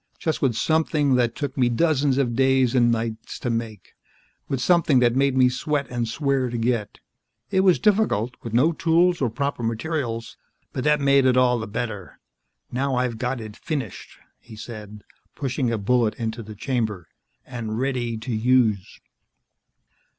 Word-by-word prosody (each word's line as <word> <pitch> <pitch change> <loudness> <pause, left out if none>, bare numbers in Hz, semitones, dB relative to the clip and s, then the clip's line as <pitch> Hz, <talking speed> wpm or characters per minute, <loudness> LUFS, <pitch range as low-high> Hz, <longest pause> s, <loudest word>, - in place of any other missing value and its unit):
Just 160 - -2
with 130 -5 +1
something 155 -1 +1
that 120 -2 +2
took 145 -3 -4
me 125 -3 +2
dozens 140 0 +2
of 125 -4 0
days 130 -1 +3
and 120 -2 +4
nights 115 -1 -3
to 120 - -3
make. 115 -4 -5 0.5
With 135 - -2
something 165 0 +3
that 120 -1 +3
made 135 0 +2
me 130 -1 +6
sweat 140 +3 -1
and 120 -1 -2
swear 135 0 0
to 120 - -3
get. 115 -3 -1 0.5
It 190 - +2
was 190 -2 +5
difficult 195 - +1
with 115 - -7
no 130 +9 +3
tools 170 +2 +2
or 130 - +2
proper 140 +3 -3
materials 115 0 -3 0.4
but 130 - -3
that 150 0 +3
made 140 -1 +4
it 130 0 +3
all 125 -1 +3
the 110 - -5
better. 105 -3 -5 0.5
Now 135 +1 -1
I've 125 -3 -1
got 125 +1 -2
it 110 -2 -8
finished," 135 - -5 0.2
he 115 - -13
said, 105 -2 -9 0.3
pushing 130 -3 -1
a 115 - 0
bullet 115 +1 +1
into 115 0 -4
the 110 -1 -10
chamber, 110 - -2 0.4
"and 115 -4 -5
ready 125 -3 -1
to 115 +2 -5
use." 110 -3 +1
125 Hz, 165 wpm, -23 LUFS, 115-140 Hz, 0.5 s, me